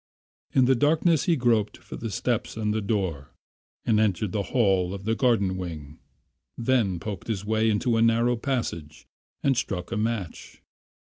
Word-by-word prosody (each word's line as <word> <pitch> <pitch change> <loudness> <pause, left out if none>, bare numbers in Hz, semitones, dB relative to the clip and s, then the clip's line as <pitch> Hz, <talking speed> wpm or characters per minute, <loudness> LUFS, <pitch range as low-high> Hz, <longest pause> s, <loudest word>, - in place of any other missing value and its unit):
In 130 - +4
the 130 - +4
darkness 155 +4 +2
he 170 - +3
groped 115 -6 +1
for - - -10
the 115 - -5
steps 110 +3 -2
and 105 -1 0
the 110 - -1
door 95 - -2 0.6
and 110 -2 +3
entered 105 -2 +1
the 105 - -1
hall 95 -6 +2
of 100 - -8
the 110 +2 0
garden 110 -6 +2
wing, 80 -4 -7 0.6
then 115 -7 +1
poked 100 -1 -6
his 105 -3 -3
way 110 +1 +2
into 115 +2 +1
a - - +2
narrow 115 +1 +3
passage 115 - -4 0.4
and 135 -1 +3
struck 95 -6 -3
a 115 - -1
match. 110 -5 -4
110 Hz, 170 wpm, -26 LUFS, 95-120 Hz, 0.6 s, In